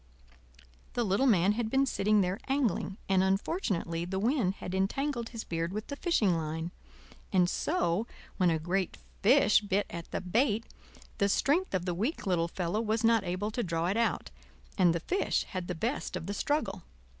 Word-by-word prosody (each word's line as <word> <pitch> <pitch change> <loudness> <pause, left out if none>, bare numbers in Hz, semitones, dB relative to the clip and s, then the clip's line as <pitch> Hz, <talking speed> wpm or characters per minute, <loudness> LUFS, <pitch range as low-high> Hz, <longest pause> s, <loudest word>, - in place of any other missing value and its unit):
The 240 - 0
little 215 +6 +2
man 195 -4 +4
had 220 +1 -1
been 270 +3 +3
sitting 210 -4 +2
there 185 +3 -1
angling, 260 -8 0
and 190 -1 +3
unfortunately 190 - 0
the 185 +2 -3
wind 215 -2 +1
had 180 - -7
entangled 235 +6 -1
his 230 -2 -6
beard 165 +1 -2
with 215 +2 -4
the 285 - -3
fishing 235 - +2
line; 160 +1 -3 0.6
and 180 -3 +4
so, 220 - 0 0.3
when 180 -2 +4
a 165 - +2
great 175 +3 -1 0.2
fish 240 0 +5
bit 205 0 0
at 170 0 -7
the - - -2
bait, 220 +4 +1 0.5
the 200 - +3
strength 300 - +2
of 180 -1 -1
the 180 - -1
weak 225 - -2
little 175 -3 +1
fellow 180 +4 -2
was 220 0 0
not 225 -2 +4
able 185 +4 -2
to 240 - -2
draw 165 -4 -1
it 195 - 0
out, 230 -1 0 0.4
and 175 -3 +4
the - - 0
fish 380 - 0
had 185 -2 -4
the 180 - -3
best 225 - -2
of 175 -3 -4
the 200 - -3
struggle. 210 -5 -1
195 Hz, 185 wpm, -30 LUFS, 180-235 Hz, 0.6 s, fish